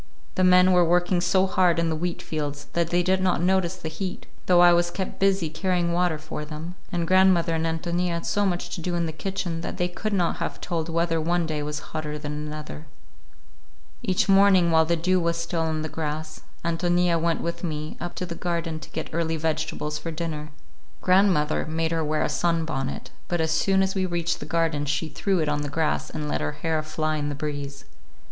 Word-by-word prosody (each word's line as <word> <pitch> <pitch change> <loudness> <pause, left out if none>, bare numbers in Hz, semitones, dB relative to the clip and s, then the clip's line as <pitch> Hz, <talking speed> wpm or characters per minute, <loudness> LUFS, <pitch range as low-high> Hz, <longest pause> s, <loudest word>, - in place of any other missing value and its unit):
The 185 - +1
men 180 0 +6
were 180 -1 +5
working 175 +1 +2
so 185 +2 +3
hard 185 -2 +3
in 170 0 +1
the - - 0
wheatfields 155 -3 -4
that 170 -1 +1
they 175 +1 +2
did 185 +1 +2
not 185 -1 +2
notice 185 0 +2
the 170 - -6
heat,—though 180 +1 -1
I 175 0 +8
was 175 0 +3
kept 190 +2 -5
busy 195 -3 +2
carrying 175 +1 0
water 175 -2 +1
for 155 0 -6
them,—and 165 +3 -5
grandmother 185 -2 +4
and 160 0 0
Ántonia 170 +2 -1
had 170 -1 -3
so 205 - +1
much 180 -3 -1
to 175 - -4
do 175 +1 -2
in 170 -1 0
the 160 - -3
kitchen 175 +1 -3
that - - -5
they 175 - +1
could 195 +4 -4
not 175 -4 +1
have - - -4
told 170 -2 -3
whether 165 0 +1
one 170 +1 +1
day 155 -2 -2
was 150 0 -5
hotter 150 -1 -3
than 150 0 -5
another. 150 +1 -6 1.1
Each 210 -2 +1
morning, 195 -3 +5
while 160 0 +5
the 170 +1 +2
dew 185 +3 +2
was 170 -1 0
still 170 0 -2
on 160 -1 -1
the - - -2
grass, 155 0 -4 0.2
Ántonia 175 0 +2
went 165 0 +1
with 170 +2 -4
me 155 -2 -3
up 175 - -5
to 180 - -3
the 170 - -5
garden 170 -2 -2
to - - -11
get 160 - -5
early 165 0 0
vegetables 155 -1 -2
for 165 - -5
dinner. 155 -2 -4 0.5
Grandmother 185 -5 +3
made 160 +1 -1
her 165 -1 0
wear 155 0 0
a - - +1
sunbonnet, 150 -2 -1 0.2
but 175 - -1
as 160 0 +1
soon 190 +4 +3
as 190 0 0
we 190 -1 0
reached 175 -1 -1
the - - -7
garden 160 -3 0
she 150 +3 -1
threw 190 +6 0
it 155 -3 0
on 150 0 0
the 145 - -3
grass 155 +2 0
and 150 - -4
let - - -1
her 75 0 -2
hair 160 -2 -1
fly 155 0 -2
in 145 -1 -2
the 145 - -3
breeze. 145 -2 -5
165 Hz, 210 wpm, -25 LUFS, 155-180 Hz, 1.1 s, I